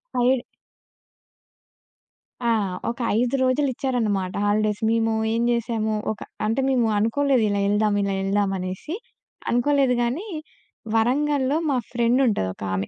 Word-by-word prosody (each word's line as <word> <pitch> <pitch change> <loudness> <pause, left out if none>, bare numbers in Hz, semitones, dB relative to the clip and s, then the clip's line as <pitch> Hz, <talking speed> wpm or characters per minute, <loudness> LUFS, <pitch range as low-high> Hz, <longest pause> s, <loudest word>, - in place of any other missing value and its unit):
5 250 +2 +4 2.1
ఆ! - - +3 0.4
ఒక 235 - -5 0.2
5 245 +2 +1
రోజులు 260 +2 +2
ఇచ్చారన్నమాట 215 -8 -1
హాలిడేస్. 210 +1 +1
మేము 225 0 +1 0.2
ఏం 230 - 0
చేసాము, 225 -2 -1 0.2
ఒక 215 - -6 0.3
అంటే 225 +5 +1
మేము 245 -4 +2
అనుకోలేదు 250 +3 +2
ఇలా 200 0 0
యెళ్దాం, 205 0 +2
ఇలా 200 0 0
యెళ్దాం 195 0 +1
అనేసి. 185 - -5 0.5
అనుకోలేదు 260 +1 +2
గాని 295 - -2 0.7
వరంగల్‌లో 275 +4 +2
మా 270 - +2
ఫ్రెండ్ 240 +1 +2
ఉంటది 200 - 0
ఒకామె. 95 0 -3
230 Hz, 120 wpm, -23 LUFS, 205-260 Hz, 2.1 s, 5